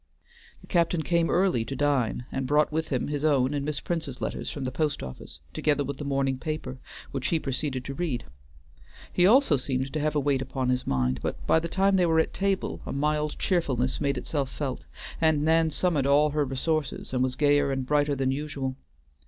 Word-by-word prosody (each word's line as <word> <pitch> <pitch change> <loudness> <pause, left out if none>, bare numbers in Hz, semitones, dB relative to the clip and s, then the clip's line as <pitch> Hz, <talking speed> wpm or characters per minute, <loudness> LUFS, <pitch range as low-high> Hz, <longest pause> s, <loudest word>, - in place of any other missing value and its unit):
The - - -14
captain 170 -1 +1
came 170 +2 +2
early 180 -10 +2
to 135 - -5
dine, 130 -5 +1
and 135 -1 -2
brought 150 +2 +3
with 160 +1 -1
him 130 -4 -1
his 145 -1 -2
own 140 -3 +3
and 145 -1 -1
Miss 150 0 -2
Prince's 160 -7 -3
letters - - -3
from 140 - -5
the 130 - -2
post 150 +2 -1
office, 65 +2 -9
together 145 -2 +1
with 140 0 -4
the - - -4
morning 135 -2 0
paper, 155 -4 -4 0.3
which 135 -2 -2
he 165 - +2
proceeded 135 -2 -3
to 140 - -4
read. 145 -6 -2 0.9
He 180 0 +5
also 230 - +5
seemed 130 +1 -2
to 155 - -1
have 150 0 0
a - - +3
weight 140 -2 +1
upon 130 -1 -2
his 125 0 0
mind, 65 0 +1
but - - -4
by 160 - +4
the 165 - -4
time 195 +2 +2
they 180 -2 +3
were 160 -1 +3
at 160 - +1
table 195 -1 -1
a - - -6
mild 150 +1 0
cheerfulness 135 -9 0
made 140 -2 +1
itself 140 +1 -2
felt, 135 -4 -4 0.3
and 160 -2 +3
Nan 160 0 +4
summoned 155 -4 +1
all 145 +2 +4
her 150 0 +1
resources 140 +2 -2
and 125 - +1
was 130 0 0
gayer 145 0 +3
and 135 -1 -2
brighter 145 +1 +2
than 135 -1 0
usual. 135 -2 -3
145 Hz, 210 wpm, -27 LUFS, 130-155 Hz, 0.9 s, He